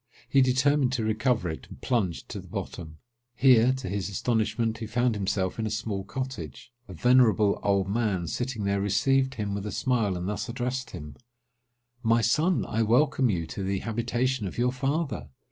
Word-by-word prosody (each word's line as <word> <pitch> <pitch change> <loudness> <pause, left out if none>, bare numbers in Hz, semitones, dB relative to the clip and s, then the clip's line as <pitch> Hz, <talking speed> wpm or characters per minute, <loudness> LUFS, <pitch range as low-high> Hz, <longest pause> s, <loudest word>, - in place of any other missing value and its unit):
He 135 - +4
determined 130 +1 +3
to 120 -4 -1
recover 110 -2 +1
it, 80 -1 -6
and - - -11
plunged 105 -9 -1
to - - -5
the - - -11
bottom. 80 -3 -6 0.4
Here, 125 -1 +5
to 130 -4 -5
his 100 +1 -2
astonishment, 110 +1 0
he 110 - -5
found 120 +2 +1
himself 100 -1 -1
in 110 - -1
a - - -2
small 105 -2 -3
cottage. 105 - -6 0.2
A 95 - -9
venerable 115 -2 +4
old 100 -2 +1
man, 100 -4 0
sitting 120 +5 -3
there, 100 0 0
received 130 +6 +2
him 105 -3 -3
with 100 +1 -4
a - - -4
smile, 105 -3 0
and 90 +1 -4
thus 105 +4 -3
addressed 125 +2 -3
him:—"My 120 - -5
son, 155 +10 +2
I 110 - -1
welcome 130 +3 +3
you 85 -5 -1
to 90 - -6
the 95 0 -1
habitation 120 +1 -1
of - - -8
your 125 +1 +2
father! 135 - -2
115 Hz, 180 wpm, -27 LUFS, 100-125 Hz, 0.4 s, Here